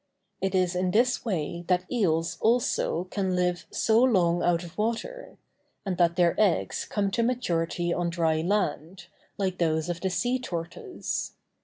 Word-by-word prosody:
It 190 0 0
is 180 -1 +1
in 180 0 +1
this 240 +6 +2
way 170 -5 -3
that 180 0 +2
eels 170 -7 0
also 225 -6 +1
can 190 -3 -1
live 180 -1 0
so 225 +1 +2
long 175 -9 +3
out 175 0 +1
of 175 0 -11
water; 235 - -3 0.5
and 190 -2 -1
that 170 -1 +3
their 175 -2 +3
eggs 200 -6 +1
come 200 -2 -1
to 235 - 0
maturity 175 -8 0
on 175 -1 -1
dry 165 -2 +1
land, 175 -1 -1 0.3
like 190 -2 -2
those 160 -1 +1
of 170 -1 -3
the 190 - 0
sea 245 +8 0
tortoise. 180 - -5
180 Hz, 160 wpm, -27 LUFS, 170-215 Hz, 0.5 s, long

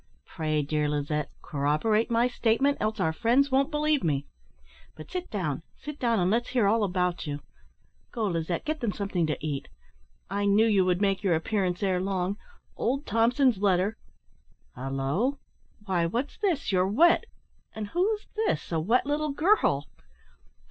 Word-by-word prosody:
Pray, 155 -3 -1
dear 150 +1 0
Lizette, 150 0 -1
corroborate 155 +11 +1
my 235 +1 +3
statement, 250 +3 +2
else 215 +1 -1
our 160 - +1
friends 245 - +2
won't 270 +2 +3
believe 300 -1 +1
me. 145 -4 0 0.7
But 155 - -11
sit 365 -1 -4
down, 165 -9 -2 0.2
sit 295 +1 -8
down, 230 -3 +2
and 180 +1 +2
let's 235 +2 0
hear 245 -5 +2
all 215 +2 +3
about 180 -3 -1
you. 145 0 -3 0.7
Go, 225 -2 -2
Lizette, 170 -2 -2
get 310 -3 -3
'em 215 -4 0
something 195 -5 -1
to 150 -3 -1
eat. 145 -3 -3 0.6
I 200 +2 -1
knew 205 +2 +4
you 200 -4 +3
would 180 +1 +1
make 195 -1 +1
your 185 -5 +2
appearance 180 +1 -1
ere 185 -2 +1
long. 190 0 -1 0.4
Old 275 +5 -1
Thompson's 235 +1 +2
letter 195 +1 +2 0.8
halloo! 135 - -1 0.5
why 175 -4 +1
what's 240 +11 -3
this? 355 - 0
You're 185 -1 +3
wet! 335 - +4 0.5
and 215 -2 -5
who's 415 - 0 0.2
this - - -2
a 165 - +1
wet 225 +12 +2
little 295 0 -1
girl?" 300 - +2
200 Hz, 160 wpm, -27 LUFS, 170-250 Hz, 0.8 s, knew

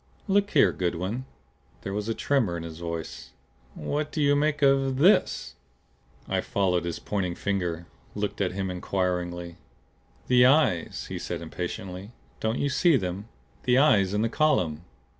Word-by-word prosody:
"Look 200 0 +2
here, - - +5
Goodwin!" 95 +8 -2 0.6
There 95 - -4
was 105 +2 -3
a 115 - -1
tremor 120 -12 +1
in 85 - -6
his 80 -1 -8
voice. 80 -7 -6 0.4
"What 150 - -3
do - - -4
you 145 -1 +4
make 150 0 +1
of 135 -1 +3
THIS?" 180 +9 +3 0.7
I - - 0
followed 90 -3 0
his 85 - -3
pointing 90 -4 -2
finger; 90 -4 -2 0.3
looked 105 0 -3
at 90 -2 0
him 95 -1 -2
inquiringly. 90 -2 -2 0.7
"The 125 -1 +5
eyes!" 135 - +2
he - - -4
said - - -5
impatiently. 90 +4 -6 0.3
"Don't 110 +2 -1
you 145 - 0
see 165 +3 +3
them? 95 0 -4 0.4
The 125 0 +4
eyes 105 -9 +4
in 105 - +1
the - - +2
column!" 90 - +1
100 Hz, 155 wpm, -26 LUFS, 90-135 Hz, 0.7 s, here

